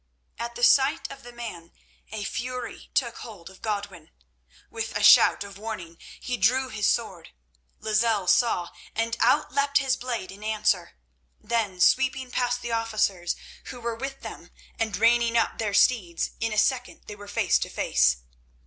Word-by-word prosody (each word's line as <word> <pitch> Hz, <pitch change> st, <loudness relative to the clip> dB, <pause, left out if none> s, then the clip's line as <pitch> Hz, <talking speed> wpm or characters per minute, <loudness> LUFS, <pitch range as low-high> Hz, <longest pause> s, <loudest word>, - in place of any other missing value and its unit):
At 235 Hz, 0 st, -5 dB
the 240 Hz, -, -5 dB
sight 275 Hz, +6 st, +4 dB
of 275 Hz, 0 st, -10 dB
the 245 Hz, -, -11 dB
man 215 Hz, -9 st, -8 dB, 0.4 s
a 215 Hz, -1 st, -4 dB
fury 250 Hz, +4 st, -5 dB
took 245 Hz, -5 st, 0 dB
hold 190 Hz, -6 st, -10 dB
of 190 Hz, -, -18 dB
Godwin. 200 Hz, -6 st, -4 dB, 0.6 s
With -, -, -3 dB
a -, -, -2 dB
shout -, -, +7 dB
of 200 Hz, -1 st, -11 dB
warning 190 Hz, -7 st, -7 dB, 0.2 s
he 250 Hz, -1 st, -3 dB
drew 255 Hz, +6 st, +2 dB
his 220 Hz, -3 st, 0 dB
sword. 190 Hz, -8 st, -1 dB, 0.5 s
Lozelle 215 Hz, -2 st, +1 dB
saw, 180 Hz, -3 st, +2 dB, 0.2 s
and 230 Hz, +1 st, 0 dB
out 240 Hz, -, +3 dB
leapt 280 Hz, 0 st, +2 dB
his 270 Hz, -2 st, +2 dB
blade 235 Hz, -7 st, -4 dB
in 200 Hz, +2 st, -12 dB
answer. 215 Hz, -4 st, 0 dB, 0.5 s
Then 210 Hz, -5 st, -2 dB
sweeping 260 Hz, +4 st, +2 dB
past 245 Hz, 0 st, -1 dB
the 240 Hz, -, -4 dB
officers 215 Hz, -6 st, 0 dB, 0.3 s
who 250 Hz, -, -8 dB
were 235 Hz, 0 st, -3 dB
with 270 Hz, +3 st, -6 dB
them -, -, -9 dB, 0.3 s
and 220 Hz, -4 st, -1 dB
reining 235 Hz, +1 st, +3 dB
up 230 Hz, -, 0 dB
their 210 Hz, -3 st, -1 dB
steeds, 195 Hz, -9 st, +2 dB
in 225 Hz, 0 st, -1 dB
a 215 Hz, -, -3 dB
second 250 Hz, +2 st, 0 dB
they 210 Hz, -, -8 dB
were 205 Hz, 0 st, -12 dB
face 200 Hz, -, +2 dB
to -, -, -3 dB
face. 60 Hz, -1 st, +2 dB
225 Hz, 165 wpm, -26 LUFS, 200-245 Hz, 0.6 s, shout